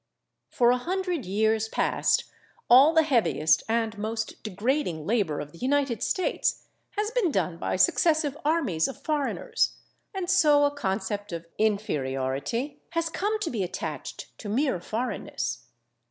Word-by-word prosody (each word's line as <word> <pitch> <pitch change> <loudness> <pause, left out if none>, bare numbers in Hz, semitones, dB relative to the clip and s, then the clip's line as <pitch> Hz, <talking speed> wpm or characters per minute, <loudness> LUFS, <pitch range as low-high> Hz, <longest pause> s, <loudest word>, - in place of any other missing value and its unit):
For 240 -2 +4
a 250 - +3
hundred 360 - -2
years 220 +3 +1
past - - +1 0.5
all 270 +5 +9
the 320 -1 +4
heaviest 220 - +3
and 225 -1 0
most 220 +1 -4
degrading 210 - -1
labor 200 -8 0
of 145 0 -6
the 170 - -15
United 270 -4 0
States 370 - 0 0.3
has 420 +1 0
been 465 -7 +2
done 180 - -1
by - - -2
successive 310 - +3
armies 285 - +1
of 270 - -8
foreigners, 300 -3 0 0.4
and 380 -3 -4
so 305 -6 +5
a 285 - +2
concept 205 -5 -3
of 170 0 -5
inferiority 200 - -1
has 335 0 0
come 415 +6 -1
to 335 - -1
be 225 -5 -2
attached 165 -6 -5
to 210 - -6
mere 260 - +1
foreignness. 175 - -3
235 Hz, 140 wpm, -27 LUFS, 190-300 Hz, 0.5 s, all